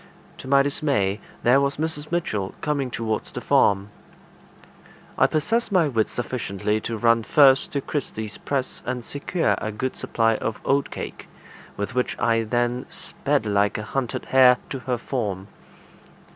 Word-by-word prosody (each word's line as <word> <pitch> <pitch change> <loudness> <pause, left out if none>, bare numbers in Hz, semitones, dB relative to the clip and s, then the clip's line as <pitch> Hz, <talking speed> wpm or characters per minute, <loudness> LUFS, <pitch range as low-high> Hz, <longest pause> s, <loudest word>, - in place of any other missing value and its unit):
To - - -9
my 140 +1 +5
dismay, 135 -9 0 0.2
there 125 +3 +5
was 140 0 0
Mrs. 155 -1 -3
Mitchell 105 - -2
coming 140 -3 -1
towards 115 -2 -3
the - - -5
farm. 100 +1 +2 1.2
I - - +4
possessed 225 +10 0
my 180 -5 +4
wits 115 -6 0
sufficiently 110 -4 -2
to 115 0 -3
run 115 +1 +3
first 135 +3 +5
to 140 - 0
Kirsty's 110 -7 -4
press 135 -2 -3
and 125 -1 -3
secure 165 +4 0
a 110 - -3
good 130 +5 -3
supply 115 -1 +1
of 110 - -3
oatcake, 140 0 -2 0.5
with 100 +4 -3
which 125 0 -1
I 115 -1 +2
then 120 +2 -1
sped 110 - -2
like 100 -1 +1
a 105 - -4
hunted 125 +1 -3
hare 130 -1 +6
to 135 - -3
her 125 -1 -2
form. 105 -6 -3
125 Hz, 150 wpm, -24 LUFS, 110-140 Hz, 1.2 s, hare